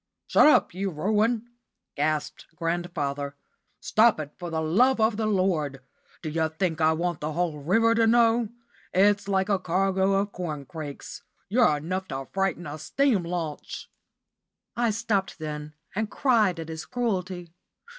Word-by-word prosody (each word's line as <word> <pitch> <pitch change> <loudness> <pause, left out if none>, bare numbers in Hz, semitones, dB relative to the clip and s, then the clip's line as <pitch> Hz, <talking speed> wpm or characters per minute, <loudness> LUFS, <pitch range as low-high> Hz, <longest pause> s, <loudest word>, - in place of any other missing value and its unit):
"Shut - - +5
up, 305 - +4
you 195 +2 -2
ruin!" 215 +7 0 0.5
gasped 155 0 -2
grandfather. 160 -5 -2 0.4
"Stop 220 -4 +4
it, 150 -1 -6
for 175 -1 -5
the 160 -1 -2
love 225 +12 +3
of 220 0 +3
the 220 0 -1
Lord. 175 -9 0 0.4
D' 155 - -3
you 160 +1 0
think 160 0 -2
I 155 0 +5
want 170 0 -2
the 150 +1 -3
whole 165 -2 -1
river 225 +10 +3
to 230 -1 +3
know? 230 -1 +4 0.5
It's 200 +1 +4
like 190 -1 +1
a 200 -2 +1
cargo 190 +2 +1
of 200 +1 +1
corncrakes. 155 -3 -6 0.3
You're 215 -8 +4
enough 185 +5 -3
to 135 -3 -5
frighten 195 -2 -1
a 150 +1 -6
steam 245 - +1
launch!" 170 -3 -5 0.8
I 235 -1 +1
stopped 210 -4 -1
then 150 -1 -6 0.2
and 215 +1 -1
cried 215 -11 +2
at 165 0 -6
his 160 0 -6
cruelty. 185 -8 -3
185 Hz, 150 wpm, -26 LUFS, 155-210 Hz, 0.8 s, Shut